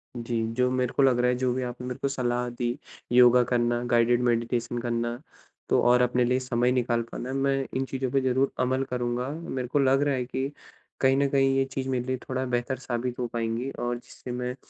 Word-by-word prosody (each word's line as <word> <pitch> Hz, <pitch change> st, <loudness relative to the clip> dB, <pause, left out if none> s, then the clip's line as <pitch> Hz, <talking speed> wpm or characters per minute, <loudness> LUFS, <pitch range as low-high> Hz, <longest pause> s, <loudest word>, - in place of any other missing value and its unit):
जी, 115 Hz, -1 st, -2 dB
जो 125 Hz, +1 st, +2 dB
मेरे 125 Hz, -1 st, 0 dB
को 140 Hz, -, +3 dB
लग 130 Hz, -2 st, +4 dB
रहा 125 Hz, 0 st, +3 dB
है, 125 Hz, -, 0 dB
जो 125 Hz, -1 st, +1 dB
भी 130 Hz, +1 st, -2 dB
आपने 125 Hz, 0 st, -5 dB
मेरे 125 Hz, -, -4 dB
को -, -, +1 dB
सलाह 125 Hz, -2 st, -1 dB
दी, 120 Hz, +1 st, -3 dB, 0.3 s
योगा 125 Hz, 0 st, +7 dB
करना, 120 Hz, -1 st, +1 dB
गाइडिड 120 Hz, 0 st, +3 dB
मैडिटेशन 120 Hz, 0 st, 0 dB
करना, 120 Hz, 0 st, -2 dB, 0.5 s
तो -, -, +4 dB
और 125 Hz, +1 st, +5 dB
अपने 125 Hz, 0 st, +2 dB
लिए 125 Hz, +1 st, +2 dB
समय 125 Hz, -1 st, +1 dB
निकाल 120 Hz, -2 st, +1 dB
पाना, 130 Hz, +2 st, -5 dB
मैं 135 Hz, 0 st, +1 dB
इन 135 Hz, +1 st, 0 dB
चीज़ों 130 Hz, -1 st, -3 dB
पे 135 Hz, -, +2 dB
ज़रूर 130 Hz, +1 st, +1 dB
अमल 130 Hz, +1 st, +1 dB
करूँगा। 125 Hz, 0 st, -1 dB
मेरे 140 Hz, -5 st, -4 dB
को 145 Hz, +4 st, +1 dB
लग 135 Hz, 0 st, +3 dB
रहा 145 Hz, -1 st, +2 dB
है 125 Hz, -1 st, -2 dB
कि 130 Hz, +2 st, -3 dB, 0.5 s
कहीं 135 Hz, 0 st, +4 dB
न 140 Hz, 0 st, +3 dB
कहीं, 135 Hz, -1 st, +3 dB
ये 135 Hz, -, +2 dB
चीज़ 135 Hz, 0 st, -4 dB
मेरे 125 Hz, -2 st, -1 dB
लिए 130 Hz, 0 st, -1 dB
थोड़ा 130 Hz, +1 st, -3 dB
बेहतर 125 Hz, +1 st, -1 dB
साबित 125 Hz, -1 st, -3 dB
हो 125 Hz, -, -1 dB
पाएँगी 115 Hz, +2 st, -2 dB
और 120 Hz, 0 st, -1 dB
जिससे 125 Hz, +1 st, -10 dB
मैं 125 Hz, 0 st, -3 dB
125 Hz, 220 wpm, -27 LUFS, 120-130 Hz, 0.5 s, योगा